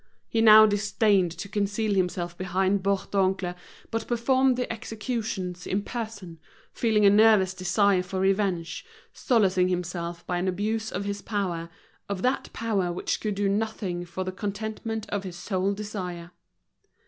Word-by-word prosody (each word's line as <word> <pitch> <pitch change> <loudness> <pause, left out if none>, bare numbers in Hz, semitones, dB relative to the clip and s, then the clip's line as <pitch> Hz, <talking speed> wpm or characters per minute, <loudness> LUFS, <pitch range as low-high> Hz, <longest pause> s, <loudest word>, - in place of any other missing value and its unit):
He 225 - 0
now 215 -1 +9
disdained 205 -2 +2
to 195 - -6
conceal 205 +1 -1
himself 180 -2 -1
behind 190 +2 0
Bourdoncle, 195 -1 0 0.4
but 225 0 -2
performed 255 +2 +2
the 250 -2 -2
executions 215 -5 -4
in 200 +2 -1
person, 205 -9 -6 0.3
feeling 220 -3 +2
a - - +9
nervous 210 -3 +5
desire 190 +1 +2
for 185 +1 -4
revenge, 190 -3 0 0.3
solacing 190 -7 +2
himself 175 -1 -3
by 180 -1 -1
an 185 - -1
abuse 215 +4 -1
of 200 +2 -3
his 200 0 -3
power, 180 -6 -3 0.4
of 200 -2 -3
that 255 +2 0
power 200 -6 -1
which 175 - -2
could 210 -2 -2
do 200 0 0
nothing 200 -3 -2
for 175 +2 -5
the 185 - -3
contentment 220 +3 -4
of 205 -1 -1
his 185 -3 -7
sole 190 +1 -1
desire. 185 -4 -5
200 Hz, 150 wpm, -26 LUFS, 185-215 Hz, 0.4 s, now